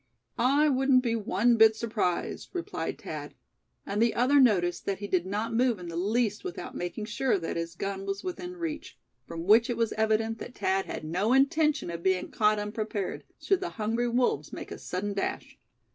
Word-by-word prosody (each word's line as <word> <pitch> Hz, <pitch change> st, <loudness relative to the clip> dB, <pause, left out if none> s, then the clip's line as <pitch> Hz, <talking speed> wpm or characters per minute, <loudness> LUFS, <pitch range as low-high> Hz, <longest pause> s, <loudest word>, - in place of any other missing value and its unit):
"I 280 Hz, +5 st, +4 dB
wouldn't 265 Hz, -2 st, +3 dB
be 230 Hz, -2 st, 0 dB
one 230 Hz, +2 st, +2 dB
bit 220 Hz, 0 st, +7 dB
surprised," 220 Hz, -6 st, -2 dB
replied 350 Hz, -2 st, -4 dB
Thad; -, -, -7 dB, 0.5 s
and 205 Hz, +2 st, -1 dB
the 235 Hz, -1 st, +3 dB
other 265 Hz, +4 st, +4 dB
noticed 185 Hz, -9 st, +3 dB
that 195 Hz, -, 0 dB
he 205 Hz, -, -6 dB
did 185 Hz, -2 st, 0 dB
not 215 Hz, +4 st, -2 dB
move 240 Hz, -1 st, +2 dB
in 175 Hz, -2 st, -8 dB
the 165 Hz, -, -6 dB
least 210 Hz, +4 st, 0 dB
without 370 Hz, -2 st, -6 dB
making 175 Hz, +5 st, -4 dB
sure 225 Hz, +2 st, 0 dB
that 165 Hz, -3 st, -4 dB
his 165 Hz, 0 st, -4 dB
gun 195 Hz, +1 st, -4 dB
was 195 Hz, 0 st, -3 dB
within 360 Hz, 0 st, -5 dB
reach; 320 Hz, -3 st, -5 dB, 0.3 s
from 165 Hz, 0 st, -6 dB
which 220 Hz, +6 st, +5 dB
it 240 Hz, -, -1 dB
was 230 Hz, -1 st, 0 dB
evident 220 Hz, +1 st, +1 dB
that 245 Hz, -, -8 dB
Thad 190 Hz, 0 st, 0 dB
had -, -, -5 dB
no 180 Hz, +9 st, 0 dB
intention 295 Hz, -, +2 dB
of 170 Hz, 0 st, -5 dB
being 185 Hz, 0 st, 0 dB
caught 215 Hz, 0 st, +3 dB
unprepared, 210 Hz, -1 st, -3 dB
should 390 Hz, -2 st, +1 dB
the 360 Hz, -, -2 dB
hungry 230 Hz, +3 st, 0 dB
wolves 245 Hz, +1 st, 0 dB
make -, -, -8 dB
a -, -, -7 dB
sudden 200 Hz, +3 st, -3 dB
dash. 200 Hz, -, -4 dB
220 Hz, 190 wpm, -28 LUFS, 195-250 Hz, 0.5 s, bit